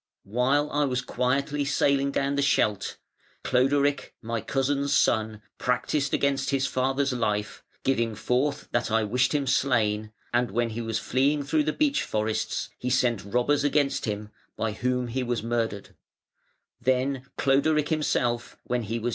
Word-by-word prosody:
While 130 Hz, +7 st, +1 dB
I 145 Hz, 0 st, +2 dB
was 125 Hz, -2 st, -1 dB
quietly 140 Hz, +4 st, 0 dB
sailing 140 Hz, 0 st, +2 dB
down 140 Hz, 0 st, 0 dB
the 140 Hz, -, +1 dB
Scheldt, 110 Hz, -7 st, +1 dB, 0.5 s
Cloderic, 140 Hz, +2 st, +1 dB
my 115 Hz, 0 st, -3 dB
cousin's 140 Hz, +4 st, 0 dB
son, 110 Hz, -1 st, +1 dB, 0.2 s
practised 135 Hz, +3 st, 0 dB
against 140 Hz, -1 st, +1 dB
his 135 Hz, -1 st, +1 dB
father's 135 Hz, +1 st, 0 dB
life, 105 Hz, -4 st, -2 dB, 0.2 s
giving 115 Hz, -4 st, +1 dB
forth 130 Hz, +7 st, -1 dB
that 120 Hz, -1 st, 0 dB
I 110 Hz, 0 st, +2 dB
wished 125 Hz, +7 st, +1 dB
him 145 Hz, -2 st, +1 dB
slain, 110 Hz, -5 st, +1 dB, 0.2 s
and 120 Hz, -1 st, +2 dB
when 115 Hz, +3 st, 0 dB
he 115 Hz, +2 st, -4 dB
was 115 Hz, -1 st, -2 dB
fleeing 140 Hz, +5 st, +1 dB
through 150 Hz, +1 st, +1 dB
the 155 Hz, -, +1 dB
beech 290 Hz, -2 st, +1 dB
forests 110 Hz, 0 st, -2 dB
he 125 Hz, -, -2 dB
sent 125 Hz, -4 st, +1 dB
robbers 125 Hz, +8 st, +1 dB
against 145 Hz, -1 st, +1 dB
him, 105 Hz, -1 st, -4 dB, 0.3 s
by 115 Hz, -, -1 dB
whom 125 Hz, +3 st, -1 dB
he 125 Hz, +3 st, -2 dB
was 120 Hz, -3 st, -2 dB
murdered. 115 Hz, -3 st, -2 dB
125 Hz, 135 wpm, -26 LUFS, 115-140 Hz, 0.5 s, I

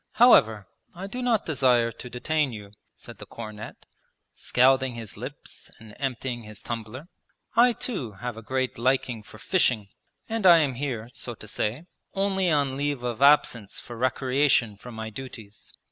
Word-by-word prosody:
'However, 110 Hz, -, +5 dB, 0.3 s
I 185 Hz, +3 st, -6 dB
do 245 Hz, +6 st, -5 dB
not 240 Hz, -4 st, +1 dB
desire 125 Hz, -6 st, +3 dB
to 125 Hz, +2 st, -10 dB
detain 145 Hz, +3 st, 0 dB
you,' 105 Hz, -3 st, -9 dB, 0.2 s
said -, -, -13 dB
the -, -, -10 dB
cornet, 110 Hz, -2 st, -9 dB, 0.5 s
scalding 130 Hz, 0 st, +2 dB
his 115 Hz, -3 st, -7 dB
lips -, -, -9 dB
and 110 Hz, -1 st, -14 dB
emptying 125 Hz, -2 st, -3 dB
his 105 Hz, -1 st, -11 dB
tumbler. 120 Hz, +6 st, -6 dB, 0.5 s
'I 240 Hz, +1 st, +6 dB
too 145 Hz, -, -4 dB
have 120 Hz, +4 st, -5 dB
a 115 Hz, -, -9 dB
great 130 Hz, +1 st, -2 dB
liking 125 Hz, -2 st, +1 dB
for 105 Hz, -, -14 dB
fishing, 120 Hz, -, +1 dB, 0.4 s
and 225 Hz, -4 st, +1 dB
I 170 Hz, -1 st, +9 dB
am 145 Hz, -5 st, +2 dB
here, 120 Hz, -4 st, -4 dB
so 120 Hz, -, -6 dB
to 110 Hz, -, -12 dB
say, 110 Hz, +7 st, -2 dB, 0.3 s
only 195 Hz, -2 st, +1 dB
on 140 Hz, -4 st, +1 dB
leave 145 Hz, -3 st, -2 dB
of 120 Hz, 0 st, -3 dB
absence 140 Hz, -7 st, +4 dB
for 120 Hz, -, -9 dB
recreation 130 Hz, -2 st, +2 dB
from 120 Hz, +3 st, -11 dB
my 110 Hz, 0 st, -5 dB
duties. 110 Hz, -3 st, -10 dB
125 Hz, 160 wpm, -26 LUFS, 110-145 Hz, 0.5 s, I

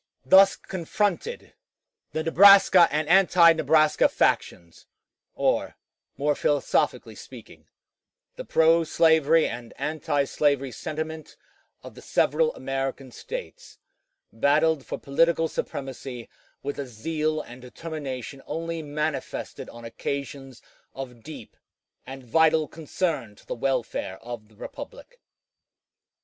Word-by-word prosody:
Thus 195 Hz, +7 st, +6 dB
confronted, 200 Hz, -, -3 dB, 0.6 s
the 160 Hz, -, -3 dB
Nebraska 190 Hz, 0 st, +7 dB
and 150 Hz, 0 st, -1 dB
anti 175 Hz, -2 st, +6 dB
Nebraska 155 Hz, -1 st, +3 dB
factions, 85 Hz, -1 st, -1 dB, 0.5 s
or, -, -, 0 dB, 0.4 s
more 145 Hz, +1 st, +1 dB
philosophically 145 Hz, 0 st, 0 dB
speaking, -, -, -13 dB, 0.7 s
the -, -, -7 dB
pro 165 Hz, -, +3 dB
slavery 160 Hz, 0 st, +3 dB
and 120 Hz, 0 st, -8 dB
antislavery 145 Hz, -2 st, 0 dB
sentiment 155 Hz, +2 st, -6 dB, 0.5 s
of -, -, -10 dB
the -, -, -13 dB
several 475 Hz, -1 st, +1 dB
American 135 Hz, -1 st, -4 dB
States, -, -, -9 dB, 0.6 s
battled 145 Hz, +5 st, +2 dB
for -, -, -4 dB
political 165 Hz, +3 st, +1 dB
supremacy 130 Hz, -5 st, -6 dB, 0.4 s
with 145 Hz, +1 st, -4 dB
a 140 Hz, -, -4 dB
zeal 155 Hz, +6 st, -2 dB
and 125 Hz, -3 st, -10 dB
determination 135 Hz, -1 st, -7 dB
only 165 Hz, 0 st, -4 dB
manifested 150 Hz, -2 st, -4 dB
on 120 Hz, 0 st, -11 dB
occasions 135 Hz, +1 st, -6 dB, 0.3 s
of 125 Hz, -3 st, -8 dB
deep 155 Hz, +6 st, -11 dB, 0.5 s
and 135 Hz, 0 st, -9 dB
vital 160 Hz, +4 st, +3 dB
concern 155 Hz, -, -3 dB
to -, -, -21 dB
the -, -, -4 dB
welfare 120 Hz, -6 st, -2 dB
of 120 Hz, -2 st, -8 dB
the 110 Hz, -, -24 dB
republic. -, -, -10 dB
150 Hz, 110 wpm, -25 LUFS, 135-165 Hz, 0.7 s, Nebraska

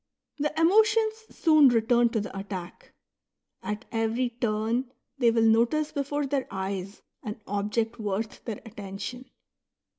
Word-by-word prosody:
The 300 Hz, +2 st, -1 dB
emotions 435 Hz, +5 st, +4 dB, 0.2 s
soon 310 Hz, -4 st, +5 dB
return 235 Hz, 0 st, +3 dB
to 230 Hz, -, -1 dB
the 205 Hz, -, -6 dB
attack; 195 Hz, -3 st, -7 dB, 0.7 s
at 210 Hz, +3 st, -4 dB
every 225 Hz, +2 st, 0 dB
turn 230 Hz, +2 st, -1 dB, 0.3 s
they 240 Hz, -3 st, +5 dB
will 230 Hz, 0 st, +3 dB
notice 235 Hz, +8 st, +3 dB
before 285 Hz, +1 st, -1 dB
their 275 Hz, -1 st, -1 dB
eyes 190 Hz, 0 st, -5 dB, 0.2 s
an 210 Hz, 0 st, -6 dB
object 210 Hz, +3 st, -1 dB
worth 210 Hz, +1 st, -3 dB
their 225 Hz, -4 st, -5 dB
attention. 225 Hz, +4 st, -7 dB
230 Hz, 125 wpm, -27 LUFS, 210-270 Hz, 0.7 s, soon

